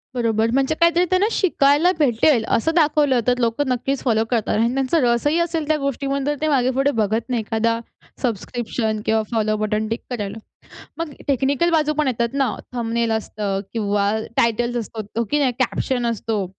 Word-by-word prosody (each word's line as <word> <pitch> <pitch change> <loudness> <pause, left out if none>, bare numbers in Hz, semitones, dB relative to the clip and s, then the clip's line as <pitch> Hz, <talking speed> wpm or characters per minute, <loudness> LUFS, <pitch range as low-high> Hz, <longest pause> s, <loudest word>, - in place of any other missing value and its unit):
बरोबर. 225 -2 +1
म्हणजे 270 +3 +1
काहीतरी 340 +1 +4
त्यांना 370 +2 +3
शिकायला 315 -1 +3
भेटेल 245 -2 +3
असं 320 +8 0
दाखवलं 295 -5 +3
तर 250 0 +3
लोकं 240 +4 0
नक्कीच 255 +2 -1
फॉलो 225 -3 +2
करतात 225 -3 0
आणि 230 +3 +1
त्यांचा 270 +4 +1
रस 235 +3 +2
ही 315 +3 +2
असेल 330 -3 -1
त्या 310 - +2
गोष्टीवर 275 0 -2
तर 295 0 0
ते 310 - +1
मागे 255 -4 +2
पुढे 275 +1 +3
बघत 220 +4 -1
नाही 240 -3 0
एखादा 230 +1 0 0.4
सबस्क्रिप्शन 225 -1 -2
किंवा 220 0 +2
फॉलो 215 -1 +1
बटन 215 0 -1
टिक 225 +2 -3
करायला. 210 -4 -4 0.6
मग 330 -3 -4 0.2
टेक्निकल 280 +5 +1
बाजू 305 -2 +2
पण 300 - +2
येतात 235 -1 -1
ना 270 -7 +1 0.2
थंबनेल 235 -1 -1
असतं 205 -3 -2
किंवा 205 -2 0 0.3
टायटल्स 235 +1 +1
असतो, 225 0 -4
की 295 - +2
नाही 270 -4 +2
कॅप्शन 255 -1 0
असतो. 225 -2 -1
245 Hz, 175 wpm, -21 LUFS, 225-285 Hz, 0.6 s, काहीतरी